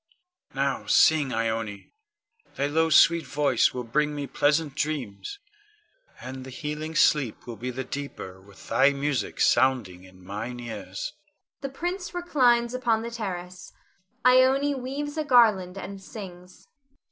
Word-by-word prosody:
Now 140 0 -1
sing, 150 -4 +4
Ione; 110 -3 -3 0.6
thy 140 - 0
low 160 +3 +1
sweet 165 +1 +6
voice 140 -2 +2
will 125 - -5
bring 150 +6 0
me 145 -1 -3
pleasant 145 +2 +1
dreams, 150 - -4 0.8
and 130 +1 -7
the 130 - -9
healing 150 +3 -5
sleep 145 -7 +2
will 120 - -7
be 120 +4 -5
the 130 +1 -4
deeper 125 -9 -7
with 100 0 -16
thy 140 +2 +4
music 140 -5 -2
sounding 120 -8 +2
in 95 0 -17
mine 115 +6 -5
ears. 120 - -6 0.5
[The 275 - -4
prince 355 +6 -4
reclines 250 -9 +2
upon 235 -3 0
the 235 - -5
terrace. 185 -5 -6 0.5
Ione 260 +3 +5
_weaves 280 +3 -5
a - - 0
garland 215 -9 +4
and 195 +1 -7
sings. 185 -3 -11
150 Hz, 135 wpm, -26 LUFS, -, 0.8 s, sweet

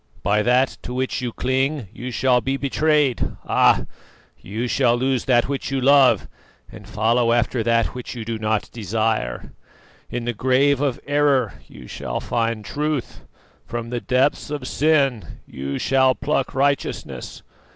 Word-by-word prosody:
By 105 +2 +2
that 125 +4 +2
to 125 - -6
which 130 0 -2
you 125 -2 -3
cling 130 0 -1
you 125 +2 -6
shall 125 0 +2
be 135 +2 -1
betrayed, 145 -1 +1
ah! - - +3 0.5
you 110 +5 -4
shall 120 -1 +2
lose 130 0 0
that 120 -2 +3
which 140 -1 -3
you 135 0 -1
love 135 0 +5 0.4
and - - -12
follow 115 +2 +2
after 120 0 +1
that 115 0 +1
which 125 0 -7
you 115 -2 -6
do 115 -1 -4
not 110 -1 -1
desire. 110 - -2 0.6
In 120 -1 -4
the 120 - -1
grave 130 +4 +2
of 140 -4 0
error 145 -7 +2
you 65 - -13
shall - - -4
find 115 -2 -2
truth, 150 -1 -3 0.5
from 115 0 -5
the 120 -1 -2
deeps 130 +4 +1
of 145 -3 -4
sin 135 - +1
you 70 +1 -5
shall 130 -1 +3
pluck 145 -4 -1
righteousness. 140 +1 -2
125 Hz, 150 wpm, -22 LUFS, 115-135 Hz, 0.6 s, love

